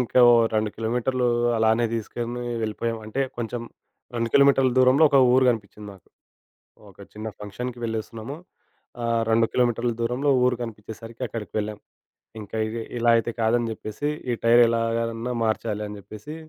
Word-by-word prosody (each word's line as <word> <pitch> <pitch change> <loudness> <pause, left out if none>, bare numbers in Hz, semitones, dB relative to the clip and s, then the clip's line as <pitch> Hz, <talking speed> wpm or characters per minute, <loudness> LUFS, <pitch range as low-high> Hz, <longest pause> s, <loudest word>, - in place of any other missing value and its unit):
ఇంకో 125 +1 +3 0.3
2 110 -1 +1
కిలోమీటర్లు 125 +3 0 0.3
అలానే 110 +1 +3
తీసుకొని 120 +2 -4 0.2
వెళ్ళిపోయాం. 115 +1 -2
అంటే, 110 +6 -3 0.2
కొంచెం 120 0 -4 0.5
2 115 0 -1
కిలోమీటర్ల 140 -2 +5
దూరంలో 130 +4 +5
ఒక 140 - +5 0.2
ఊరు 130 - +5
కనిపించింది 105 -2 -6
నాకు. 95 - -19 0.8
ఒక 95 - -21
చిన్న 110 +1 -6
ఫంక్షన్‌కి 120 +4 -6
వెళ్ళలేస్తున్నాము. 115 +3 -4 0.7
ఆహ్, 115 -1 +1
2 115 0 +4
కిలోమీటర్ల 120 -1 +1
దూరంలో 125 +5 0 0.2
ఊరు 125 - +2
కనిపించేసరికి, 115 +2 -9
అక్కడికి 110 -1 -7
వెళ్ళాం. 105 0 -4 0.6
ఇంకా 105 +1 -7
ఇగ 110 - -6 0.2
ఇలా 120 0 +2
అయితే 115 +1 -1
కాదని 115 +1 +2
చెప్పేసి, 110 +6 -5 0.2
ఈ - - +1
టైర్ 120 +1 +6
ఎలాగన్నా 115 +1 -1
మార్చాలి 110 -1 -1
అని 105 - -8
చెప్పేసి, 110 +9 -10
115 Hz, 140 wpm, -24 LUFS, 110-120 Hz, 0.8 s, టైర్